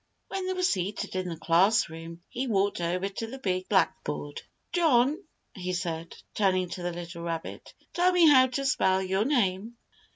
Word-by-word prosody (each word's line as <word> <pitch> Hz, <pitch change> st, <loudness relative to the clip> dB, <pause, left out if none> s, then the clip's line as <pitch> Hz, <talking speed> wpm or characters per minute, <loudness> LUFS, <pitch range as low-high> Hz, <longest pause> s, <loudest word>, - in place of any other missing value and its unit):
When 385 Hz, -1 st, -3 dB
they 375 Hz, -, 0 dB
were 365 Hz, 0 st, -2 dB
seated 200 Hz, -, -1 dB
in 185 Hz, -1 st, -2 dB
the 165 Hz, -, -4 dB
schoolroom, 165 Hz, -1 st, +1 dB
he 260 Hz, +2 st, -4 dB
walked 200 Hz, -4 st, +1 dB
over 180 Hz, +3 st, -1 dB
to 200 Hz, +3 st, -5 dB
the 260 Hz, +4 st, -8 dB
big 185 Hz, -6 st, -2 dB
blackboard. 150 Hz, -6 st, 0 dB, 0.3 s
"John," 305 Hz, -1 st, +3 dB, 0.3 s
he 185 Hz, -2 st, -4 dB
said, 170 Hz, -2 st, -4 dB, 0.2 s
turning 185 Hz, -3 st, +1 dB
to 180 Hz, -, -6 dB
the 175 Hz, 0 st, -2 dB
little 170 Hz, 0 st, -7 dB
rabbit, 165 Hz, -1 st, -6 dB, 0.2 s
"tell 360 Hz, +1 st, +3 dB
me 355 Hz, -2 st, +5 dB
how 260 Hz, -3 st, +7 dB
to 275 Hz, +2 st, -3 dB
spell 190 Hz, -7 st, +2 dB
your 190 Hz, +3 st, 0 dB
name." 225 Hz, -4 st, 0 dB
190 Hz, 170 wpm, -28 LUFS, 175-255 Hz, 0.3 s, how